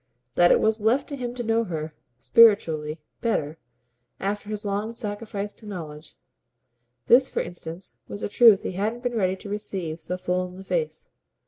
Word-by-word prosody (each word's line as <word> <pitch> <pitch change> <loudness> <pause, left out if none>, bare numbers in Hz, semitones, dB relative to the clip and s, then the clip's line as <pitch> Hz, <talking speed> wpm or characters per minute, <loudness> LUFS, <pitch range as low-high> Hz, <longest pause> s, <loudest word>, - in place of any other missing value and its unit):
That 175 +5 +5
it - - +5
was 220 0 +2
left 245 +6 +2
to 285 - -4
him 245 -2 -5
to 245 - -3
know 225 0 +2
her, 155 -4 -4 0.2
spiritually, 155 - +4 0.2
"better" 160 - -1 0.6
after 205 +1 -3
his 210 -1 -4
long 205 +3 -2
sacrifice 210 -2 -4
to 215 - -14
knowledge 160 -6 -8 0.9
this 260 +2 +6
for - - -1
instance 170 -5 -8
was 100 0 -7
a - - 0
truth 225 - +6
he - - -3
hadn't 215 +6 -2
been 245 -1 -1
ready 190 -5 +1
to 190 - -11
receive 195 -6 -4
so 180 - -3
full 180 0 -1
in 180 0 -12
the 190 - -9
face. 475 - -3
200 Hz, 180 wpm, -25 LUFS, 175-225 Hz, 0.9 s, this